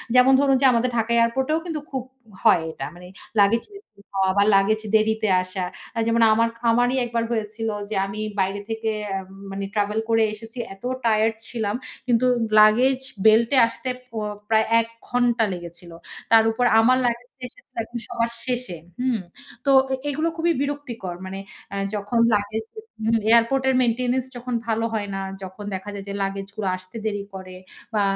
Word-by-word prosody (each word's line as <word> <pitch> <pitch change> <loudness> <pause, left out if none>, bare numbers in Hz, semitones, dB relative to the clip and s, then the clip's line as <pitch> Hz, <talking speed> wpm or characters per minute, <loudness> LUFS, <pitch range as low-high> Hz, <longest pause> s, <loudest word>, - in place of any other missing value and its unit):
যেমন 250 +1 +7
ধরুন 275 -1 +4
যে - - +4
আমাদের 245 +1 +2
ঢাকা 225 +1 0
এয়ারপোর্টেও 260 +6 +2
কিন্তু 325 -3 -3
খুব 265 -3 -2 0.4
হয় 175 - +5
এটা, 135 - -6
মানে 180 +1 -12 0.3
লাগেজ 205 +4 +4
মিসিং 400 - -16
হওয়া 190 -1 +2
বা 200 - +6
লাগেজ 210 +3 +3
দেরিতে 220 0 +2
আসা। 185 +1 -4 0.3
আ - - +1
যেমন 230 0 +2
আমার 230 +1 +3 0.2
আমারই 245 +2 +3
১ 240 - -4
বার 230 - +2
হয়েছিল 220 0 -2 0.2
যে 215 - -3
আমি 200 +2 -6 0.2
বাইরে 195 +1 0
থেকে 225 0 -2 0.3
এম 190 -1 -7 0.2
মানে 195 0 -4
ট্রাভেল 210 +1 +1
করে 225 0 +4
এসেছি। 225 +3 -11 0.2
এত 195 - -20 0.2
টায়ারড 220 0 +3
ছিলাম। 220 -3 -2 0.3
কিন্তু 240 0 +3 0.3
লাগেজ 245 +5 +5 0.3
বেল্টে 230 +5 +5
আসতে 255 +2 -6 0.2
প - - -44 0.4
প্রায় 220 0 +4
১ 230 - -1 0.2
ঘন্টা 245 -2 +2
লেগেছিল। 175 0 -9 0.4
তার 225 -1 +7
উপর 245 +2 0
আমার 250 +3 +5
লাগেজটা 245 +2 -3
এসেছিল - - -18
একদম 240 +2 -7
সবার 230 0 -1
শেষে, 245 -8 -3 0.2
হুম? 250 -3 +1 0.5
তো 280 - +2 0.2
এ - - +2
এগুলো 310 +4 0
খুবই 335 +1 +2
বিরক্তিকর। 280 -11 -4
মানে 190 +1 -6 0.3
অ্যা 200 - -4 0.2
যখন 205 +3 -1
লাগেজ 210 +2 0
এ - - -6 0.3
হু, 230 - +3 0.2
এয়ারপোর্ট 235 +4 +4
এর 260 - +2
মেইনটেন্যান্স 250 +1 +1
যখন 245 +1 -5
ভালো 225 0 0
হয় 205 -2 -2
না, 195 - -3 0.2
যখন 190 +2 -8
দেখা 190 +2 -6
যায় 200 -1 -7
যে 200 - -4
লাগেজ 195 0 -3
গুলো 210 -3 -3
আসতে 185 +2 -16
দেরি 205 -2 -2
করে 185 -1 -9 0.4
বা 210 - +2
225 Hz, 175 wpm, -23 LUFS, 205-245 Hz, 0.5 s, যেমন